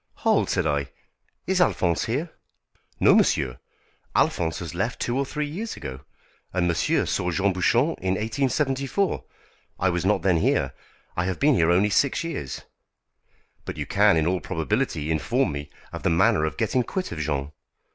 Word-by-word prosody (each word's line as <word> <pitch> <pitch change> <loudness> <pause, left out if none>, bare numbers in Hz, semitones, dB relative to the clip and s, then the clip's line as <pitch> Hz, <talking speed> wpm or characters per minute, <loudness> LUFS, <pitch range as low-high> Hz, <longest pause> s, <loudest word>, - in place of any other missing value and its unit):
"Hold," - - +3
said - - +1
I; 70 -2 0 0.6
"is 190 -1 +1
Alphonse 85 - +2
here?" 140 +9 -2 0.7
"No, - - +6
monsieur, 60 -2 +2 0.6
Alphonse 80 -2 +1
has 85 -4 -6
left 100 +8 -2
two 120 - -1
or 135 0 0
three 150 +1 -2
years 195 +10 -5
ago. 65 0 -6 0.5
And 90 -1 +1
monsieur 85 - +1
saw 90 - -1
Jean 95 +3 +1
Bouchon 120 - +2
in 95 0 0
1874. 135 - 0 0.6
I 95 - +2
was 85 -1 -1
not 105 +3 +2
then 90 -3 +3
here. 80 - +1 0.4
I 85 - 0
have 95 -1 -2
been 145 +1 +4
here 85 -8 +3
only 95 +4 +3
six 140 - +2
years." 150 - -5 1.0
"But - - -6
you - - -3
can 85 - +4
in 80 - +2
all 90 +2 +1
probability 80 - -1
inform 80 -1 +1
me 70 0 -6 0.2
of - - -5
the - - +1
manner 80 -2 +3
of 80 -4 -4
getting 130 - +1
quit 185 +9 -3
of 80 - -5
Jean." 70 -1 -2
95 Hz, 170 wpm, -25 LUFS, 80-135 Hz, 1.0 s, No